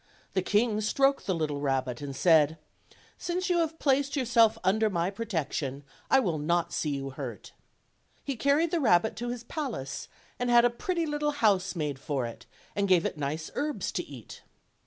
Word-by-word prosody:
The 190 - +2
king 210 +3 +1
stroked 270 0 +2
the 190 - +1
little 150 -3 -2
rabbit 130 -3 -1
and 140 -1 -5
said: 160 0 +4 0.6
"Since 365 +2 -1
you 345 - +3
have 325 -1 -1
placed 280 -1 +1
your 265 -3 0
self 225 -2 +4
under 215 +3 +3
my 175 -1 0
protection 160 - -3 0.3
I 270 - +6
will 175 - 0
not 170 +3 0
see 155 - -1
you 135 -1 -3
hurt." 135 - -7 0.7
He 275 - -3
carried 285 +7 +2
the 345 - +1
rabbit 220 - +3
to 240 +2 -3
his 240 -1 -5
palace 240 - -5 0.3
and 245 0 0
had 240 0 +6
a 240 - +3
pretty 340 - -2
little 295 -1 -1
house 200 -8 +2
made 150 -5 -2
for 135 -4 -2
it, 115 - -9 0.3
and 200 0 +1
gave 180 -3 +4
it - - -1
nice 150 +3 -3
herbs 290 -9 -2
to 175 - -2
eat. 130 -8 -11
205 Hz, 185 wpm, -28 LUFS, -, 0.7 s, I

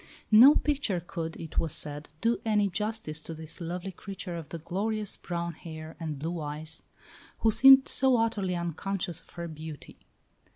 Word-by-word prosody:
No 245 +7 +9
picture 280 -11 0
could, 165 -1 -5
it 165 - -3
was 160 -3 0
said, 145 +1 -3
do 230 +1 +2
any 210 -2 +2
justice 210 -5 -2
to 165 - -7
this 160 +3 -7
lovely 175 +3 -4
creature 185 -1 -7
of 165 -3 -7
the 170 - -5
glorious 205 +5 -2
brown 170 -1 -4
hair 160 0 -9
and 155 -3 -4
blue 165 +4 -3
eyes, 155 +2 -5 0.6
who 225 - +4
seemed 265 +3 +8
so 265 -2 +3
utterly 210 -5 0
unconscious 175 +1 -3
of - - -27
her 170 -1 -5
beauty. 155 -2 -9
175 Hz, 165 wpm, -29 LUFS, 160-215 Hz, 0.6 s, No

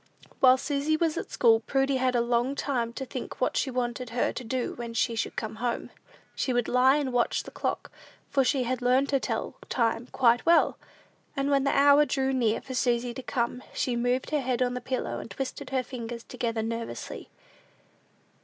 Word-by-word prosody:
While 255 0 +7
Susy 290 +3 0
was 325 -1 +1
at - - -4
school, 225 -2 +4
Prudy 270 +3 +1
had 255 -1 +1
a 240 - +3
long 240 +3 +1
time 245 -5 -1
to 265 - -5
think 255 0 -7
what 255 - 0
she 275 - +1
wanted 245 -1 -2
her 240 +1 0
to 255 - -6
do 250 +1 -2
when 235 -1 -7
she 230 - +1
should 225 - -3
come 220 0 -4
home. 240 +1 -2 0.4
She 255 - -1
would 245 -1 +1
lie 255 +2 +5
and 280 -4 -1
watch 245 -1 +1
the - - -10
clock, - - -3 0.4
for 275 - +2
she 260 0 +1
had 250 +1 -2
learned 255 +3 +3
to 275 - +2
tell - - -3
the - - -17
time 230 0 0
quite 240 -1 +3
well; 335 0 +4 0.6
and 275 +1 0
when 275 -1 +3
the 275 - +2
hour 285 +1 +7
drew 270 -2 0
near 230 -4 +1
for 260 - -8
Susy 240 -1 0
to 260 - -6
come, 245 0 -2
she 250 - 0
moved 245 +3 0
her 300 -2 +1
head 255 -1 0
on 245 0 -1
the 250 - -4
pillow, 255 +1 -3
and - - -8
twisted 255 +5 -5
her 260 -1 0
fingers 235 -2 -6
together 230 -2 -3
nervously. 230 +1 -5
250 Hz, 205 wpm, -27 LUFS, 235-270 Hz, 0.6 s, While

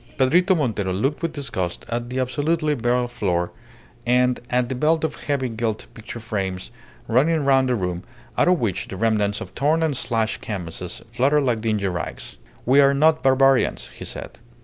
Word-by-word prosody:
Pedrito 175 +8 +4
Montero 110 -10 -1
looked 135 - -1
with 165 -1 -1
disgust 115 - -4
at 120 +1 -3
the 130 +1 -2
absolutely 150 +4 0
bare 120 -1 +1
floor, 90 -7 -1 0.5
and 125 +1 +2
at 125 0 +1
the 130 - -3
belt 155 +5 +1
of 160 - 0
heavy 140 -3 0
gilt 115 -2 -3
picture 115 +1 -8
frames 95 -5 -4 0.4
running 145 +5 +2
round 135 -1 +4
the 125 - +2
room, 90 -4 -2 0.3
out - - +3
of 180 -2 +4
which 105 -7 -1
the 95 - -7
remnants 105 -2 +1
of - - -8
torn 155 +4 +2
and 155 -3 +1
slashed 115 -3 -1
canvases 90 -3 -6
fluttered 140 +5 +2
like 120 -4 0
dingy 110 -3 0
rags. 90 -2 -5 0.3
"We 135 +3 +6
are 140 0 +5
not 155 +2 +4
barbarians," 135 0 +3
he - - -11
said. - - -7
125 Hz, 175 wpm, -23 LUFS, 110-140 Hz, 0.5 s, We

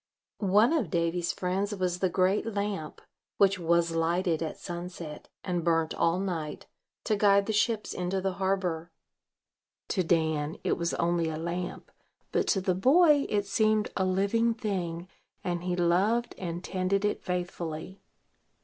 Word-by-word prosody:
One 225 +8 +6
of 270 - 0
Davy's 170 +1 0
friends 195 +3 -2
was 180 -2 -1
the 185 - +2
great 185 +5 +1
lamp, 200 -6 -3 0.4
which 195 -1 +4
was 170 0 +2
lighted 170 0 +1
at 160 - -3
sunset, 175 -3 -7
and 175 -2 -1
burnt 165 -1 +1
all 170 +1 +2
night, 165 -6 -4 0.4
to 215 - +1
guide 200 -1 +4
the 220 - -1
ships 215 +1 +1
into 180 +2 -1
the 190 0 -1
harbor. 180 -4 0 1.0
To 185 - +1
Dan 160 -2 0
it - - +1
was 170 0 -1
only 170 -1 +1
a 155 - -4
lamp; 170 +2 -4 0.4
but - - +1
to 195 - +2
the 185 0 +1
boy 290 - +5
it 205 -1 +1
seemed 215 +1 +2
a 190 - +1
living 200 +5 +2
thing, 180 -6 -3 0.4
and 175 -1 -2
he 180 -1 0
loved 190 +7 +2
and 175 -1 -4
tended 195 +2 0
it 210 - -1
faithfully. 180 0 -4
180 Hz, 150 wpm, -29 LUFS, 170-200 Hz, 1.0 s, One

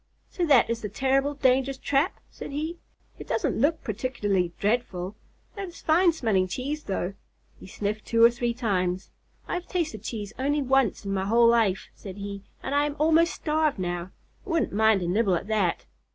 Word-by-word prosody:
"So 350 -2 -1
that 275 -5 +6
is 230 0 -2
the 210 - -4
terrible, 270 +5 +1
dangerous 265 0 +2
trap?" 285 +8 0
said - - -8
he. 310 +4 -4 0.4
"It - - -9
doesn't 290 - 0
look 310 +4 +2
particularly 205 -5 -1
dreadful. 205 -3 -1 0.4
That 400 -2 -5
is 345 - -12
fine 340 +3 +4
smelling 220 - +1
cheese 280 +10 -4
though." 195 -1 -2 0.5
He - - -11
sniffed 210 +2 -3
two 230 0 +3
or 235 - +8
three 240 0 -2
times. 190 -6 -1 0.4
"I - - -3
have 360 0 -3
tasted 315 - -2
cheese 215 -2 -5
only 290 +2 +1
once 265 -6 +1
in 195 - -2
my 190 0 -1
whole 230 +3 +5
life," 225 -5 +2
said 195 -1 -10
he, 200 0 -6 0.2
"and 265 - -3
I 290 +1 +3
am 290 - -5
almost 325 +3 +3
starved 310 -1 0
now. 175 -1 -3 0.3
I - - -12
wouldn't 330 -9 0
mind 220 -2 +3
a - - -2
nibble 195 +1 +2
at 170 - -3
that." 205 -5 0
235 Hz, 190 wpm, -26 LUFS, 200-290 Hz, 0.5 s, or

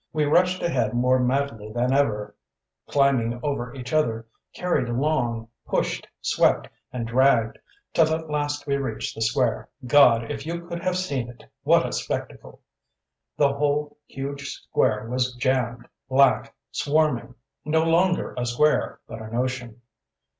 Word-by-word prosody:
We 155 -1 +1
rushed 180 +5 +2
ahead 120 -9 0
more 125 +1 +3
madly 125 -4 -1
than 120 +3 0
ever; 110 -7 +1 0.6
climbing 130 -4 +2
over 140 -5 -2
each 125 0 -7
other, 115 -7 +1 0.3
carried 150 -9 -1
along, 120 -3 -1 0.2
pushed, - - -1
swept, - - +2 0.2
and 120 -2 -3
dragged, 120 -2 +3 0.3
till 160 -1 +4
at 160 0 -2
last 145 -1 -2
we 140 -1 0
reached 130 -5 -3
the 115 - -8
square. 115 -1 0 0.2
God, 120 -3 +5
if 140 -1 -5
you 170 +2 -5
could 170 0 -6
have 185 0 0
seen 140 -10 -2
it! 120 - -13 0.2
What - - +4
a - - -3
spectacle! - - -5 0.8
The 140 -2 +3
whole 145 +1 -1
huge 140 +1 -5
square 110 0 -1
was 125 +1 -1
jammed, 125 -2 -1 0.2
black, 130 -3 +3 0.2
swarming; 145 -5 0 0.3
no 160 +1 +2
longer 175 +2 +2
a 120 - -1
square, 150 +6 +1
but 110 - -8
an 110 +1 -7
ocean. 125 -2 -3
130 Hz, 145 wpm, -24 LUFS, 120-150 Hz, 0.8 s, God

